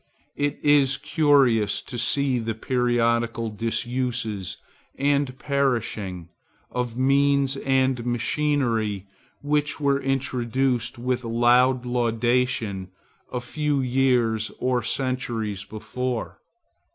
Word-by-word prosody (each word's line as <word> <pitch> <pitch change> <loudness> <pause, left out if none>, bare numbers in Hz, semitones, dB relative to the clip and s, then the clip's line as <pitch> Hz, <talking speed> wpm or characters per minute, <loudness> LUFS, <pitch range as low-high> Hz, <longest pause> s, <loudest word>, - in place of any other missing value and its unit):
It 145 0 -1
is 140 -2 +5
curious 135 -10 +3
to - - -8
see 135 +1 +1
the 115 -1 -3
periodical 115 -1 0
disuse 115 -3 -2 0.4
and 140 -2 0
perishing 115 - -1 0.4
of 125 -1 -3
means 140 +1 +3
and 130 -2 +1
machinery 120 - 0 0.4
which 150 +1 0
were 140 -1 +1
introduced 130 -2 -1
with 125 +1 -2
loud 120 +2 +3
laudation 120 -4 0 0.4
a 125 - -2
few 150 +3 -1
years 125 -4 +1
or 125 -1 0
centuries 115 -5 -2
before. 125 +3 -4
125 Hz, 90 wpm, -24 LUFS, 115-135 Hz, 0.4 s, is